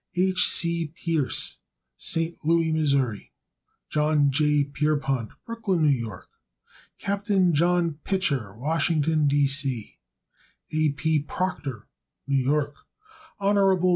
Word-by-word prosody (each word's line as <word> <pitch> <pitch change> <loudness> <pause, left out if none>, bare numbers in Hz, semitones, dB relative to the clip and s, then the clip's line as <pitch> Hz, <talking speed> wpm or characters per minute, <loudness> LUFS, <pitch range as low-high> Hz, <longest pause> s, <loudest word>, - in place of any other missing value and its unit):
H. 185 +1 +3
C. 170 -1 +1
Pierce, 160 -2 -2 0.4
St. 165 - -1
Louis, 165 0 +2 0.2
Mo. 130 -5 +1 0.8
John 150 -2 +2
J. 150 +1 +3
Pierrepont, 140 -4 -1 0.2
Brooklyn, 220 -8 0
N. 135 -4 +2
Y. 95 -4 -9 0.8
Capt. 200 +2 -3 0.2
John 170 0 +2
Pitcher, 140 - -1
Washington, 155 +2 +1
D. 145 0 +3
C. 135 -5 -2 0.7
A. 155 0 +2
P. 155 +1 +1
Proctor, 145 - -4 0.4
New 140 -1 +1
York. 145 +2 +1 0.6
Hon. 200 0 +2
150 Hz, 105 wpm, -25 LUFS, 140-170 Hz, 0.8 s, H